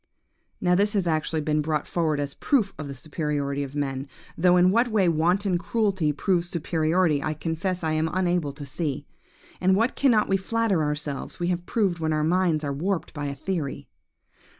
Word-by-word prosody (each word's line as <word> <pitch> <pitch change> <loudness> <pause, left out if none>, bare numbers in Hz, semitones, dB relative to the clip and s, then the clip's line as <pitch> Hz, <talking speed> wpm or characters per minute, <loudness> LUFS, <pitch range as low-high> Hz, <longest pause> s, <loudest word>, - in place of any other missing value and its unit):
"Now 180 -1 +2
this 205 +4 +2
has 195 -4 +1
actually 160 -1 0
been 150 0 +1
brought 150 -1 -1
forward 160 -4 0
as 145 -1 -3
a - - -26
proof 225 -9 +1
of 155 - -5
the 140 - -6
superiority 145 -1 -2
of 140 0 -5
man; 135 -1 -2 0.3
though 180 +1 +4
in 180 +1 +5
what 235 +4 +3
way 215 -5 +2
wanton 175 +3 +2
cruelty 190 -5 0
proves 175 +3 0
superiority, 165 -2 +1
I 155 +2 -2
confess 165 +4 -2
I 160 - 0
am 155 +1 +1
unable 175 -5 0
to 145 0 -8
see. 145 0 -3 0.5
But 185 - +1
what 230 +5 +1
cannot 235 -6 +3
we 195 - +2
flatter 210 -2 0
ourselves 150 -1 -3
we 175 0 0
have 175 -1 -2
proved 195 -7 0
when 160 -1 0
our 155 0 +1
minds 165 -1 +2
are 140 -1 -2
warped 180 +5 -2
by 145 -2 -4
a 140 - -4
theory! 160 -5 -4
165 Hz, 195 wpm, -25 LUFS, 150-185 Hz, 0.5 s, in